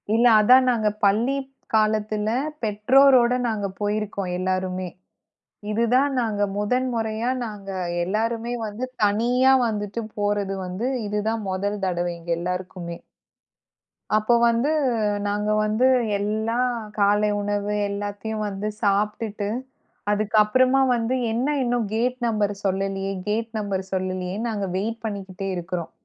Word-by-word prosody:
இல்ல. 235 +2 +4
அதான் 255 +4 +6
நாங்க 215 -3 +1 0.2
பள்ளி 230 +7 +2 0.4
காலத்துல 215 0 +1 0.3
பெற்றோரோட 245 +4 +5
நாங்க 210 -3 -1
போயிருக்கோம் 205 -3 -2
எல்லாருமே. 185 0 -2 0.8
இது 225 +2 +1
தான் 275 +2 +3
நாங்க 210 -3 -1
முதன்முறையா 230 0 -1 0.2
நாங்க 205 -3 -7 0.3
எல்லாருமே 225 +4 -1
வந்து 210 +5 -4 0.2
தனியா 245 +6 +3
வந்துட்டு 210 +1 -3 0.2
போறது 205 -1 0
வந்து. 195 +8 -3 0.2
இது 210 0 -1
தான் 225 -1 -2
மொதல் 200 +2 -2
தடவ 175 -1 -1
எங்க 170 0 -8
எல்லாருக்குமே. 180 -1 -4 1.2
அப்ப 215 +3 +3
வந்து 235 +6 +1 0.6
நாங்க 210 +1 -1
வந்து 215 +5 +2 0.3
எல்லாம் 220 +4 0 0.3
காலை 205 +1 +3
உணவு 205 0 -1 0.2
எல்லாத்தையும் 205 +2 -4
வந்து 200 +1 -4
சாப்டுட்டு. 205 0 0 0.6
அதுக்கப்றமா 215 +6 +3
வந்து 235 +2 0 0.2
என்ன 265 +6 0
இன்னும் 240 -3 0
கேட் 250 +2 0
நம்பர் 210 -2 0
சொல்லலியே 195 0 -1
கேட் 225 +2 -1
நம்பர் 195 -2 -2
சொல்லலியே. 185 0 -2
நாங்க 205 -3 -2
வெயிட் 225 +3 -2
பண்ணிக்கிட்டே 195 -2 -5
இருக்குறோம். 175 -1 -4
210 Hz, 115 wpm, -24 LUFS, 200-230 Hz, 1.2 s, அதான்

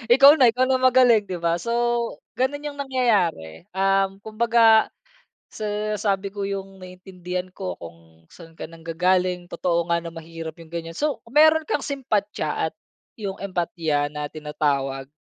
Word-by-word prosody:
ikaw 275 +2 +9
na, 255 - +7
ikaw 245 +3 +2
na 260 0 +2
magaling 250 -4 +5
di 185 - -4
ba? 170 0 0
So, 235 - -4 0.7
gano'n 290 +3 -1
yung 285 - -15
nangyayari, 205 - 0
um, 195 0 +2
kumbaga 225 0 +4 0.6
sa 210 0 -3
sabi 200 -1 -1
ko 200 0 -4
yung 195 -1 -5
naiintindihan 185 0 -7
ko 185 0 -5
kung 80 -1 -14
saan 165 -2 -14
ka 160 - -8
nanggagaling 180 +2 0
totoo 170 -1 -1
nga 170 - +3
na 170 0 -6
mahirap 165 0 -8
yung 165 - -12
ganyan. 165 0 -5
So 270 - -2
mayro'n 315 +2 +5
kang 295 - -1
simpatya 245 -8 -2
at - - -33 0.4
yung 200 -3 -5
empatiya 165 -6 -1
na 150 0 -4
tinatawag 140 -3 -2
190 Hz, 150 wpm, -23 LUFS, 165-225 Hz, 0.7 s, ikaw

